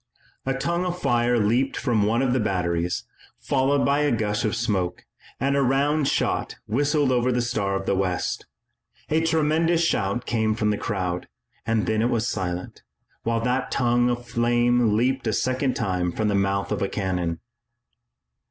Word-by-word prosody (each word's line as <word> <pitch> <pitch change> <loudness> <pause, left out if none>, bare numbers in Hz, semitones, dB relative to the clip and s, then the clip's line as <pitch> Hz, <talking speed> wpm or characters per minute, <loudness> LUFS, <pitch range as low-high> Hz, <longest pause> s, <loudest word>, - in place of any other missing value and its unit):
A 135 - +1
tongue 170 +6 -1
of 180 -1 -2
fire 120 -4 +2
leaped 120 +5 +1
from 120 -5 +1
one 115 +5 +2
of 125 -2 +1
the 130 - +2
batteries, 90 -4 -1 0.3
followed 140 +1 +1
by 140 +1 +2
a 150 -1 +2
gush 105 -2 0
of 110 -1 0
smoke, 105 -7 -1 0.3
and 140 +1 +1
a 140 - +3
round 140 +3 +2
shot - - 0
whistled 145 +4 +1
over 125 0 +2
the 125 - +1
Star 110 -5 -1
of 95 - -3
the - - +1
West. 95 -2 -1 0.6
A 155 +1 +2
tremendous 165 +1 +2
shout 105 -4 0
came 110 -2 0
from 105 -1 +1
the - - +1
crowd, 90 -4 -2 0.4
then 110 -1 +1
it 120 - +2
was 120 -1 0
silent, 90 -4 -4 0.4
while 115 0 0
that 125 +2 0
tongue 120 -1 +2
of 120 0 -3
flame 120 -1 +2
leaped 130 +1 0
a 110 - +1
second 130 +3 0
time 90 -2 -1
from 110 +3 -1
the - - +1
mouth 100 0 0
of - - -1
a 100 - 0
cannon. 90 -4 -2
120 Hz, 170 wpm, -24 LUFS, 100-135 Hz, 0.6 s, a